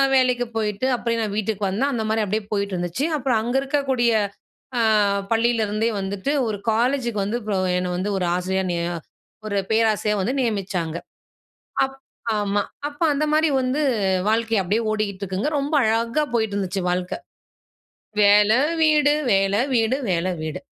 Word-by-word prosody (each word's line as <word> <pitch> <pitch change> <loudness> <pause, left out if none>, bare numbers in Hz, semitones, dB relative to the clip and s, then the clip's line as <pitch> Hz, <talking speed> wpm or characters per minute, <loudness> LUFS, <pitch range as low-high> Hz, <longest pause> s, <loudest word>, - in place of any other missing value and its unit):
வேலைக்கு 250 -1 +3
போயிட்டு, 210 +2 -1
அப்பயே 235 -1 -1
நான் 210 -2 -2
வீட்டுக்கு 210 -1 -1
வந்தேன். 260 +9 0
அந்தமாரி 220 -1 0
அப்படியே 210 +1 -2
போயிட்டு 200 -1 -1
இருந்துச்சு. 175 - -1
அப்புறம் 250 -5 +1
அங்க 245 +3 -2
இருக்கக்கூடிய 265 -4 +1 0.7
அ - - +3 0.5
பள்ளியிலேருந்தே 225 -1 +1
வந்துட்டு 195 +7 -2 0.2
ஒரு 210 -2 -2
காலேஜுக்கு 240 -1 0
வந்து 215 +4 -1
ப்ரோ 205 -3 -1 0.2
என்ன 180 0 -1
வந்து 190 +3 -2
ஒரு 180 - 0
ஆசிரியரா 190 +1 -1
நிய 170 -1 -1 0.6
ஒரு 200 -1 -1
பேராசிரியரா 215 -2 +2
வந்து 245 +7 -1
நியமிச்சாங்க. 190 -7 -2 0.9
அப் 270 0 -4 0.4
ஆமா. 205 0 0 0.3
அப்ப 290 0 -10
அந்தமாரி 305 +2 +2
வந்து 260 +4 0 0.5
வாழ்க்கைய 225 -2 +1
அப்படீயே 215 +6 0
ஓடிட்டுருக்குங்க. 200 +2 -2
ரொம்ப 285 +3 -3
அழகா 230 +6 +1
போயிட்டு 220 -3 0
இருந்துச்சு 190 -1 -2
வாழ்க்க. 180 0 -1 1.1
வேலை, 210 +2 +6 0.3
வீடு, 300 -1 +4 0.2
வேலை, 195 +2 +3 0.2
வீடு, 230 +2 +2
வேலை, 180 +1 0
வீடு. 155 -1 -4
215 Hz, 140 wpm, -22 LUFS, 200-245 Hz, 1.1 s, வேலை